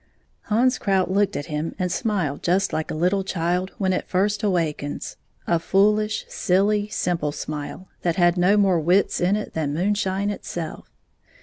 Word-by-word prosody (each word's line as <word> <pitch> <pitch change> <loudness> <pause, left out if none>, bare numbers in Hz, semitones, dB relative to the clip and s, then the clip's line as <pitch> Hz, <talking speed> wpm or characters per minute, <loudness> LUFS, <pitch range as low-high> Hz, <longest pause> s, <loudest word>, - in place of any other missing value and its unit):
Hans 250 +4 +2
Krout 190 -2 +1
looked 200 0 +2
at 145 - -3
him 150 +2 -3
and 180 -2 -1
smiled 185 - -1
just 190 +3 +1
like 155 - -2
a - - -3
little 180 +5 +1
child 180 0 -1
when 190 -2 +1
it - - -2
first 205 +3 +1
awakens 165 -7 -2 0.2
— - - -44
a 170 - +2
foolish, 210 +4 +2
silly, 205 +2 +1
simple 170 -7 -1
smile 150 +5 -6
that 170 -2 0
had 175 -1 +4
no 185 +3 +3
more 190 -4 +3
wits 180 +5 +2
in 180 +3 +3
it 210 - -4
than 150 -2 -2
moonshine 200 +2 0
itself. 170 -5 -6
185 Hz, 170 wpm, -23 LUFS, 170-205 Hz, 0.2 s, had